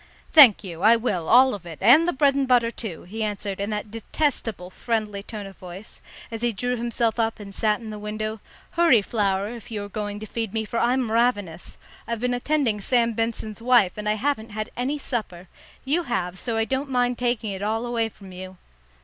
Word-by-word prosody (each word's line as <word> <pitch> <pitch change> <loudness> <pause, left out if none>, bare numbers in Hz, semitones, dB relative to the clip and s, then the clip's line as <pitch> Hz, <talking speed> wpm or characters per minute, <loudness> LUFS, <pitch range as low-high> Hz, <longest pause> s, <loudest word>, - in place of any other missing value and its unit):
"Thank 265 -10 +8
you, 170 -3 -8
I 220 +3 +7
will, 205 -8 -2
all 255 +2 +6
of 200 -4 -6
it, 165 -2 -8
and 275 - +6
the - - +3
bread 280 -1 +3
and 275 -1 0
butter, 240 -2 +3
too," 215 -8 -6
he 220 +6 -7
answered, 205 -2 -3
in 200 +1 -2
that 210 -1 -4
detestable 225 - -2
friendly 215 -2 -2
tone 210 0 -7
of 195 -1 -11
voice, 185 +3 -11 0.3
as 225 -1 -5
he 240 0 +2
drew 245 +4 -2
himself 235 -1 -1
up 225 -1 0
and 200 -1 -9
sat 210 +1 +1
in 225 -2 -8
the 210 - -7
window. 215 +1 -4 0.3
"Hurry, 330 -11 +4
Flower, 200 -2 0
if 235 -2 -9
you 210 -3 -4
are 205 - -8
going 205 0 -4
to 215 - -7
feed 225 -2 -4
me, 220 0 -1
for 230 +2 -2
I'm 245 -1 +1
ravenous. 205 -8 0 0.3
I've 235 -1 -2
been 250 0 0
attending 245 -4 0
Sam 235 +1 +2
Benson's 225 -1 -3
wife, 235 -6 +4
and 210 0 -3
I - - +3
haven't 235 -1 -1
had 215 +1 -5
any 265 +4 -1
supper. 210 -10 -4 0.4
You 300 +6 +2
have; 185 -6 -2
so 230 -3 -2
I 225 - +1
don't 270 +3 -2
mind 245 -1 0
taking 240 -3 -1
it 190 0 -6
all 220 +3 -1
away 230 -2 -1
from 195 -3 -14
you." 185 0 -9
225 Hz, 215 wpm, -24 LUFS, 205-245 Hz, 0.4 s, Thank